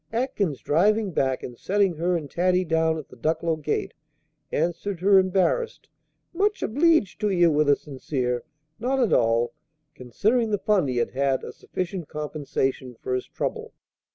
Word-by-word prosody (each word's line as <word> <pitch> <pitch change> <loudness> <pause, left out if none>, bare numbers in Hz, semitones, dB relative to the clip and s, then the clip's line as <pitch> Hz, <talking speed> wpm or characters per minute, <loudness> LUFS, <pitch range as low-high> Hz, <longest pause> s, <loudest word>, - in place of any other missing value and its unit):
Atkins, 225 - -1
driving 205 +6 +2
back, 135 -4 0
and 125 - -7
setting 195 - +1
her 175 +2 +1
and 155 -3 -6
Taddy 180 +4 +1
down 160 0 +1
at 155 - -8
the - - -13
Ducklow 160 +5 0
gate, 150 -1 -2 0.6
answered 175 +4 -1
her 195 0 +6
embarrassed 190 - 0 0.4
"Much 405 +4 0
obleeged 290 - +2
to 210 -1 +1
ye," 175 -3 +4
with 150 -2 +3
a 145 - +6
sincere 130 -4 -3 0.4
"Not 260 +4 0
at 240 -5 +2
all," 115 0 +2 0.4
considering 215 - 0
the 205 - +1
fun 200 -6 +2
he 125 -2 -2
had 120 - 0
had 135 0 0
a - - -7
sufficient 180 -3 -5
compensation 140 -4 -3
for 130 - -3
his 125 - -2
trouble. - - -4
170 Hz, 160 wpm, -25 LUFS, 140-205 Hz, 0.6 s, her